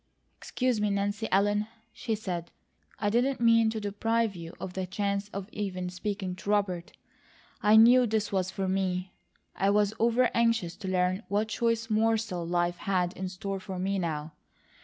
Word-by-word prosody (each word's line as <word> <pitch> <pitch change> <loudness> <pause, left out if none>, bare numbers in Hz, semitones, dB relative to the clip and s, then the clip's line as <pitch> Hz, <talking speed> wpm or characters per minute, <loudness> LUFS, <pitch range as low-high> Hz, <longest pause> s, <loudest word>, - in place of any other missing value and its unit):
"Excuse 250 -4 -1
me, 210 - +2
Nancy 205 +2 -1
Ellen," 205 +2 +2 0.3
she 225 -3 -2
said. 180 -5 -4 0.5
"I 205 -1 0
didn't 255 +4 +1
mean 230 -1 +5
to 220 0 -3
deprive 220 +1 0
you 165 0 -8
of 185 - -6
the 190 0 -3
chance 200 +1 -2
of 195 -1 -6
even 185 -3 -4
speaking 190 0 -3
to 195 - -7
Robert. 190 -4 0 0.7
I 210 +1 +5
KNEW 240 +3 +7
this 215 -1 -1
was 185 -2 0
for 190 0 -3
me; 185 -1 -1 0.4
I 195 - +2
was 205 0 +3
over 235 +2 +3
anxious 230 -7 +1
to 200 - -7
learn 185 +1 +1
what 210 +2 0
choice 230 0 0
morsel 220 -4 +1
life 175 0 0
had 180 -2 0
in 185 0 -4
store 195 +1 -4
for 190 0 -6
me 195 +2 -1
now. 155 -3 -3
200 Hz, 170 wpm, -29 LUFS, 185-220 Hz, 0.7 s, KNEW